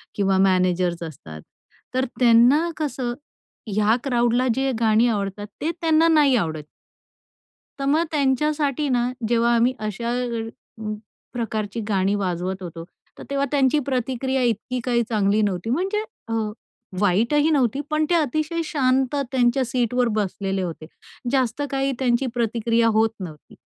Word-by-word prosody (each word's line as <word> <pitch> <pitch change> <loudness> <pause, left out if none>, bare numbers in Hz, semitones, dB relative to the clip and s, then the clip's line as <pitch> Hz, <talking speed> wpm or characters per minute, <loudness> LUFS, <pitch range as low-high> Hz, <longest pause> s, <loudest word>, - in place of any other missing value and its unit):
किंवा 195 -1 +2
मॅनेजर्स 185 -2 +2
असतात 80 - -9 0.5
तर 260 0 +2
त्यांना 250 +7 +5
कसं 265 -5 -2 0.5
ह्या 215 +1 +2
क्राउडला 240 -1 +1
जे 270 +1 0
गाणी 225 +1 +4
आवडतात, 205 -2 -2
ते 315 - 0
त्यांना 325 0 +4
नाही 295 -5 +5
आवडत. 160 -8 -1 1.2
तर 275 - -2
मग 300 +4 +3
त्यांच्यासाठी 290 0 +1
ना, 245 -1 +1 0.2
जेव्हा 235 +1 +2
आम्ही 240 +2 +3
अशा 215 +2 -3
अ, 230 -2 -5 0.5
प्रकारची 220 -2 -3
गाणी 195 0 +1
वाजवत 185 -1 -2
होतो, 165 -1 -7 0.3
तर - - -9
तेव्हा 280 0 0
त्यांची 280 0 +3
प्रतिक्रिया 260 0 -1
इतकी 240 +2 -1
काही 235 -1 +1
चांगली 210 -1 +2
नव्हती. 200 0 -1
म्हणजे 385 - 0 0.3
अ, - - -2 0.7
वाईटही 230 - +2
नव्हती. 270 -2 +1
पण 305 0 +1
ते 350 - +3
अतिशय 310 +2 0
शांत 265 -2 +1 0.2
त्यांच्या 255 0 +2
सीटवर 245 0 0
बसलेले 195 -1 -2
होते. 165 -3 -5 0.5
जास्त 260 -1 0
काही 270 0 0
त्यांची 250 0 +1
प्रतिक्रिया 230 -1 +1
होत 220 +1 +3
नव्हती. 160 -6 -10
240 Hz, 135 wpm, -23 LUFS, 205-270 Hz, 1.2 s, त्यांना